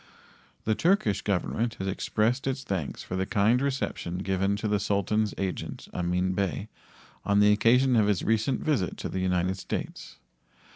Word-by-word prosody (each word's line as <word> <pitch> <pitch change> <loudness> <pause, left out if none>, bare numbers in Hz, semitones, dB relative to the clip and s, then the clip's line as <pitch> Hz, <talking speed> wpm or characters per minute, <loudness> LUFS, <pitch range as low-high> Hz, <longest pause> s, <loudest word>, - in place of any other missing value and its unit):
The 110 - +2
Turkish 165 - +2
Government 110 +4 -1
has 95 - -4
expressed 110 +6 0
its 135 0 -2
thanks 95 - -3
for 95 - -5
the 95 0 -1
kind 110 +5 +3
reception 135 -10 -2
given 95 +1 +1
to 105 +2 -3
the 105 -1 +1
Sultan's 105 +2 0
agent, 95 -2 -4
Amin 90 +1 0
Bey, 100 +2 -2 0.5
on 100 0 +2
the 105 0 +6
occasion 125 +4 +4
of 110 -3 +4
his 100 -4 +1
recent 115 +4 +1
visit 130 - 0
to - - -4
the 95 - -3
United 90 0 0
States. - - -5
105 Hz, 160 wpm, -27 LUFS, 95-115 Hz, 0.5 s, the